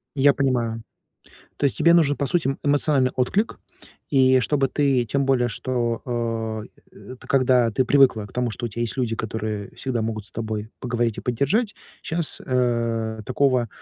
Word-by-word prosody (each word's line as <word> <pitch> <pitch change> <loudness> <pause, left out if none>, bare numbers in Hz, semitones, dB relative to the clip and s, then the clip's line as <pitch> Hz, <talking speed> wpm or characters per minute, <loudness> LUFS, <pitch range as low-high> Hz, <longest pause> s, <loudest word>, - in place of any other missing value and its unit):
Я 140 0 +5
понимаю. 120 -5 0 0.8
То - - -3
есть 140 - +3
тебе 170 0 +5
нужен, 150 -4 +3
по 140 - -1
сути, 170 -2 0
м, 135 - -2
эмоциональный 145 -2 +2
отклик. 195 - -1 0.5
И 130 -3 +4
чтобы 135 +2 +1
ты, 135 -3 +1
тем 140 +5 0
более, 125 -3 +2
что, 120 -1 -2
а, 115 -2 -2 0.3
э, 130 - -11
т - - -15
когда 125 -3 +3
ты 130 +4 +1
привыкла 130 -6 +4
к - - -17
тому, 125 -1 -1
что 120 +2 -4
у - - -4
тя 115 +2 -6
есть 120 +2 -2
люди, 120 -3 -1
которые 110 -2 -4
всегда 125 -4 -2
могут 110 -2 -3
с - - -9
тобой 110 -1 -4
поговорить 120 -3 -1
и - - -2
поддержать, 145 - 0 0.3
щас, 165 -1 -1
э, 115 -3 0
такого, 130 -3 +1
125 Hz, 180 wpm, -23 LUFS, 115-135 Hz, 0.8 s, Я